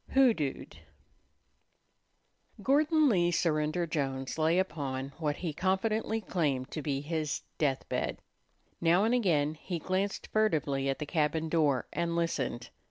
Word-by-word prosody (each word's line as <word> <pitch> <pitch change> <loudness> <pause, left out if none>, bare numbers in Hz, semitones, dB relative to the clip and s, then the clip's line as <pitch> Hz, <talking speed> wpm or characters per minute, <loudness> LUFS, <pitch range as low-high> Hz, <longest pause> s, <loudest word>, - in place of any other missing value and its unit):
HOODOOED 225 - +2 1.8
Gordon 305 +3 +4
Lee 175 -8 +3
Surrender 160 0 +1
Jones 135 -3 -3
lay 160 +2 +3
upon 140 -7 -2
what 150 -3 0
he 165 -2 -4
confidently 215 +6 0
claimed 145 -9 -1
to 155 - -4
be 140 -2 -2
his 155 -1 -2 0.2
death 135 -3 0
bed. - - -2 0.6
Now 175 +4 +4
and 225 +3 +2
again 160 -11 +2
he 170 +3 -5
glanced 190 +4 -2
furtively 150 -10 +1
at 135 - 0
the 150 - -4
cabin 155 0 0
door 150 -6 +2
and 170 0 -1
listened. 135 -8 -2
160 Hz, 130 wpm, -30 LUFS, 145-185 Hz, 1.8 s, Gordon